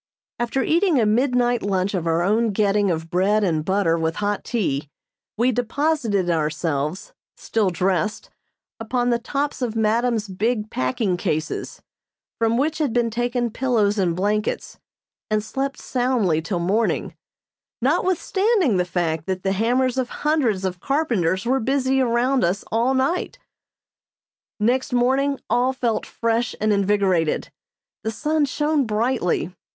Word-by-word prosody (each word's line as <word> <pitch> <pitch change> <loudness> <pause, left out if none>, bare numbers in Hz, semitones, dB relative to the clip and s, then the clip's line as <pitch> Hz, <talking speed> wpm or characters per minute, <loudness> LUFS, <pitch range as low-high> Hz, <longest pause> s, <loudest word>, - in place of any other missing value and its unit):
After 240 +3 0
eating 335 -3 +2
a 225 - +3
midnight 245 +2 +2
lunch 195 0 0
of 175 -3 -2
our 165 +1 +2
own 215 +3 +2
getting 205 0 +2
of 165 -1 -3
bread 200 +4 +2
and 160 -5 +1
butter 185 -2 +1
with 160 0 -1
hot 205 -1 -1
tea, 150 - -2 0.5
we 245 +3 +3
deposited 245 - 0
ourselves, 155 0 -1 0.2
still 215 -4 0
dressed, 185 +4 -1 0.5
upon 245 +2 0
the 235 - +1
tops 280 +4 -3
of 235 -3 -2
madam's 225 0 +1
big 215 +3 -1
packing 175 - 0
cases, 160 -4 -3 0.6
from 230 0 +2
which 310 +4 0
had 290 -7 0
been 235 -1 +1
taken 240 0 -1
pillows 220 -5 +1
and 175 -3 +1
blankets, 210 +3 -2 0.5
and 215 -1 +1
slept 270 +4 -3
soundly 245 -11 0
till 170 +3 -3
morning, 195 +7 0 0.6
notwithstanding 360 - +1
the 180 - +1
fact 165 -3 -2
that 185 -1 -2
the 195 - +1
hammers 250 +5 +1
of 250 -1 -1 0.2
hundreds 245 -11 +1
of 180 -1 -3
carpenters 230 - 0
were 260 +3 +2
busy 265 +1 +1
around 250 +1 +2
us 180 +4 0
all 235 +4 +2
night. 310 - 0 1.2
Next 250 +5 +1
morning 265 +3 +2
all 250 +2 +2
felt 240 -4 -1
fresh 230 +1 -1
and 215 0 +2
invigorated. 195 -5 +1 0.5
The 220 - -1
sun 300 +6 0
shone 295 -1 0
brightly. 215 -5 0
225 Hz, 140 wpm, -22 LUFS, 190-255 Hz, 1.2 s, a